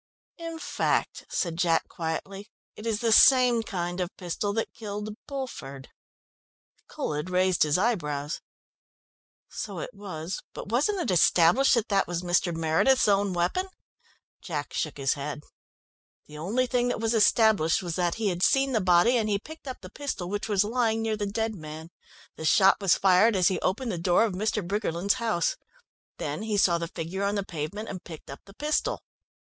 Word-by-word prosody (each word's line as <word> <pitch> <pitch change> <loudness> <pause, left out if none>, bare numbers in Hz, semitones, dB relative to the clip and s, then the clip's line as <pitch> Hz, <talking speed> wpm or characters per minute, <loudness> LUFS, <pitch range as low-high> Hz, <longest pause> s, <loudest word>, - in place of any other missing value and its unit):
"In 330 -1 -6
fact," - - -1
said 170 -3 -2
Jack 170 -2 +2
quietly, 195 +5 -5 0.3
"it 215 - -7
is 220 -1 -1
the 230 -1 +1
same 250 0 +6
kind 175 -4 -4
of 175 - -2
pistol 185 +3 -3
that 225 +1 -2
killed 210 -1 -6
Bulford." 190 - -7 1.0
Colhead 150 +4 -4
raised 185 0 +1
his 150 +1 +4
eyebrows. 150 -9 -1 1.1
"So - - -6
it - - -5
was, 180 -3 -6
but - - -7
wasn't 300 - +1
it 310 - -1
established 180 - +5
that 235 -2 -1
that 200 -2 +2
was 175 0 -3
Mr. 175 0 +1
Meredith's 165 +12 +2
own 200 -1 +2
weapon?" 180 - -1 0.7
Jack 150 -5 -5
shook 155 - -2
his 135 -1 +1
head. 145 +1 -6 0.8
"The 150 - -13
only 205 +12 0
thing 245 -1 0
that 245 - -1
was 225 +1 0
established 215 -6 +3
was 170 -2 -3
that 175 -2 0
he 220 -2 0
had 175 -1 -3
seen 270 +6 +3
the 225 -4 +1
body 180 +7 +4
and 215 -1 -1
he 200 - +2
picked 315 +7 -12
up 260 - -6
the 185 0 -11
pistol 270 -11 -4
which 205 +2 -3
was 205 -1 +3
lying 225 0 0
near 220 -1 0
the 205 -1 -3
dead 220 +2 -2
man. 160 -2 -9 0.5
The 160 - -6
shot 195 +5 +5
was 195 -4 +4
fired 195 +4 +4
as 180 -2 +4
he 190 - -1
opened 225 +6 -1
the 175 - -3
door 175 +5 +3
of 215 - -3
Mr. 210 -1 -1
Briggerland's 200 +3 -1
house. 215 -7 0 0.6
Then - - -4
he 215 -1 -1
saw 175 -3 +3
the 170 - -3
figure 175 +3 -5
on 200 +1 0
the 200 -1 -2
pavement 170 +7 -5
and 185 -2 -7
picked 160 -4 -10
up 140 - -9
the 195 - -16
pistol. 300 +3 -1
195 Hz, 180 wpm, -27 LUFS, 170-225 Hz, 1.1 s, same